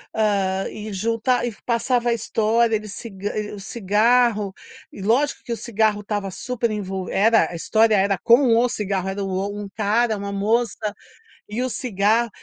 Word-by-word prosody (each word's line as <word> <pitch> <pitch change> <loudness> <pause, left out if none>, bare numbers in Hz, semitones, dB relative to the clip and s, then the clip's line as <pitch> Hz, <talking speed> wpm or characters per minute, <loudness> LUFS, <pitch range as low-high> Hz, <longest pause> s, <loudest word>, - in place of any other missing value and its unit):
hã, 195 -3 +1
e 215 0 -7
junta 230 +5 0
e 240 - -1
passava 240 0 +1
a 235 - +3
história. 225 +1 +1
Ele 215 0 -4
cig 205 0 -9 0.4
o - - -9
cigarro, 210 0 +2 0.4
e - - -10
lógico 245 +9 +1
que 240 - -7
o 230 - -4
cigarro 215 -3 0
estava 205 -1 -3
super 240 +4 -3
envo 190 -3 -4
era 225 +2 +3
a 175 - -7
história, 220 +5 +3
era 195 -1 +2
com 235 0 +5
o 240 +2 +3
cigarro. 195 -4 -2
Era 195 +1 -3
o 195 +2 -3
um 205 - -6
cara, 220 +1 +1
uma 200 0 -5
moça 215 +3 +1 0.7
e 220 +4 -3
o 255 - -1
cigarro 225 0 +1
215 Hz, 170 wpm, -22 LUFS, 200-235 Hz, 0.7 s, com